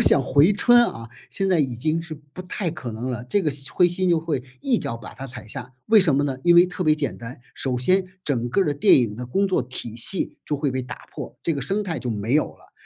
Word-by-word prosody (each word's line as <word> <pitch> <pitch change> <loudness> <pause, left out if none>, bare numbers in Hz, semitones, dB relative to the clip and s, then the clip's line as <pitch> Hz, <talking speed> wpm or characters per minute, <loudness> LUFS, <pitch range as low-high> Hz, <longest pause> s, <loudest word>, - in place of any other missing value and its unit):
想 135 - +6
回 145 +7 +4
春 240 +4 +5
啊， 115 0 -7 0.2
现 195 - -2
在 180 -4 +3
已 130 -4 -1
经 155 +7 -1
是 165 -1 -7
不 145 +3 -13
太 180 -1 -3
可 140 -7 -7
能 120 +4 -4
了， 120 -1 -4
这 200 +11 0
个 155 - +1
犀 135 -1 -1
灰 180 - +3
犀 180 +2 -1
牛 170 -2 +3
就 160 - -9
会 145 -6 -2 0.2
一 255 -4 +2
脚 115 - -4
把 115 - -11
它 135 - -8
踩 125 -3 -1
下， 125 +2 -8
为 220 -1 +6
什 160 -8 +4
么 145 - +2
呢？ 135 -2 -3
因 175 +3 +5
为 175 +1 +7
特 180 0 -5
别 155 -3 +4
简 150 -2 -2
单， 120 +1 -9 0.2
首 130 -2 -1
先， 185 +9 +2 0.2
整 120 -4 -1
个 195 +10 +2
儿 - - -1
的 150 - 0
电 145 - +5
影 115 -4 -1
的 125 +3 -7
工 195 +11 +1
作 185 -9 +1
体 120 -2 -5
系 145 +11 -1
就 150 - -1
会 145 -1 -1
被 130 - -2
打 125 - -9
破， - - -8
这 165 - 0
个 140 - -3
生 195 +11 0
态 170 -6 -3
就 125 - -5
没 110 +1 -2
有 150 +2 +3
了。 - - -20
145 Hz, 300 characters per minute, -23 LUFS, 125-175 Hz, 0.2 s, 为